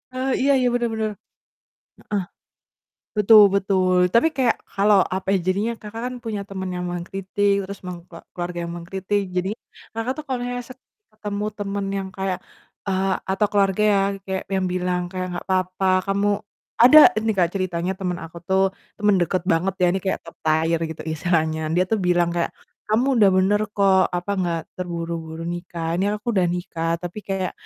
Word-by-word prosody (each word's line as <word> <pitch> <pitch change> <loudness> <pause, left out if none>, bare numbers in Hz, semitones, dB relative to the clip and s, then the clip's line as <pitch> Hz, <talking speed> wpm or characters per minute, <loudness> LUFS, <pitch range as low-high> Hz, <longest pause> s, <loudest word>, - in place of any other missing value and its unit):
Eh, 260 +1 -1
iya 275 +1 +4
iya, 255 -1 +3
benar 240 -1 +1
benar, 220 -1 -1 1.0
heeh. 200 -3 +1 0.9
Betul 210 +1 +8
betul, 185 -2 +2
tapi 235 +8 +5
kayak 250 -3 +2 0.2
kalau 200 +1 +4 0.2
apa 190 - -5
ya - - +4
jadinya, 205 +5 +1
Kakak 220 +2 -8
kan 255 - -7
punya 210 -3 -3
teman 190 -1 -4
yang 180 0 -3
mengkritik, 195 +3 -1 0.2
terus 200 - -7
meng 175 -1 -6 0.3
keluarga 175 0 -4
yang 170 - -6
mengkritik, 190 +3 -2
jadi 185 +3 -1 0.4
Kakak 225 +3 -2
tuh 305 - -7
kalau 255 -3 -3 0.2
se 255 - -10 0.4
ketemu 210 -1 -4
teman 200 -1 -3
yang 195 -1 -2
kayak, 190 -1 -2 0.5
eee, 190 0 +1 0.2
atau 195 +2 +2
keluarga 200 0 +2
yang 195 0 +2
kayak, 190 -1 -3
yang 190 -1 0
bilang, 180 0 0
kayak, 185 +1 -4
"Nggak - - -8
apa-apa 185 0 -1 0.2
kamu" 200 +1 +2 0.5
ada 295 +6 +10
nih 220 0 0
Kak, 175 -2 +4
ceritanya 185 -1 -1
teman 180 -2 -3
aku 165 +1 -12
tuh, 190 0 +4 0.3
teman 205 -1 +3
deket 180 +1 0
banget 175 +3 +1
ya 180 - +3
ini 190 - 0
kayak 190 - -1
top - - -10
tier 160 +1 +2
gitu 160 -1 -7
istilahnya. 160 -1 0 0.2
Dia 180 - +4
tuh 220 - +2
bilang 175 -1 +2
kayak, 170 -1 0 0.4
"Kamu 230 +4 +3 0.2
udah 200 - +7
benar 205 +3 +3
kok, 190 -2 +4
apa, 180 +3 -3
nggak 170 -2 0 0.2
terburu-buru 165 -2 -4
nikah. 170 -1 -4
Ini 205 +2 +1
aku 235 +3 -3
udah 185 -3 +3
nikah, 170 -2 -3
tapi 175 +4 -6
kayak, 190 -2 -2
190 Hz, 175 wpm, -23 LUFS, 175-205 Hz, 1.0 s, ada